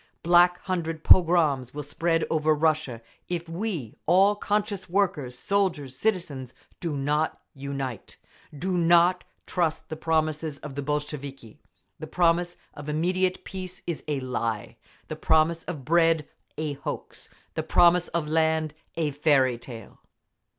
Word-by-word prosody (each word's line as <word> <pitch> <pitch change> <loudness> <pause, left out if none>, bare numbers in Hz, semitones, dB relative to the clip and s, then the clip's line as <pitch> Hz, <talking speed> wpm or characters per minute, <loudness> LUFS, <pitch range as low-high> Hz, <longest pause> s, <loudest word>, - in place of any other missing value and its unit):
Black 175 +1 +5
Hundred 165 -4 -3
pogroms 155 -8 +4
will 150 - -4
spread 165 +3 0
over 155 -1 +2
Russia, 150 -7 0 0.3
if 170 -1 -3
we 165 - -4
all—conscious 205 +2 +2
workers, 160 -10 0
soldiers, 170 -8 -1
citizens—do 155 - -3
not 150 +3 0
unite…. 135 -4 -6 0.4
Do 185 +5 -1
not 175 +2 +4 0.2
trust 170 -3 -1
the 160 - -4
promises 155 -1 -1
of 140 -1 -9
the 140 - -4
Bolsheviki! 140 -4 -5 0.4
The - - -6
promise 175 0 +1 0.2
of 145 0 -8
immediate 180 +4 0
peace—is 185 -3 -6
a 145 -2 -1
lie! 115 -4 -3 0.3
The - - -5
promise 160 +1 +2
of 150 -8 -6
bread—a 160 -2 0
hoax! 140 - -7 0.2
The - - -1
promise 175 0 +4
of 170 -3 -2
land—a 160 0 -1
fairy 135 -4 +2
tale! 115 -4 -11
160 Hz, 120 wpm, -26 LUFS, 145-175 Hz, 0.4 s, Black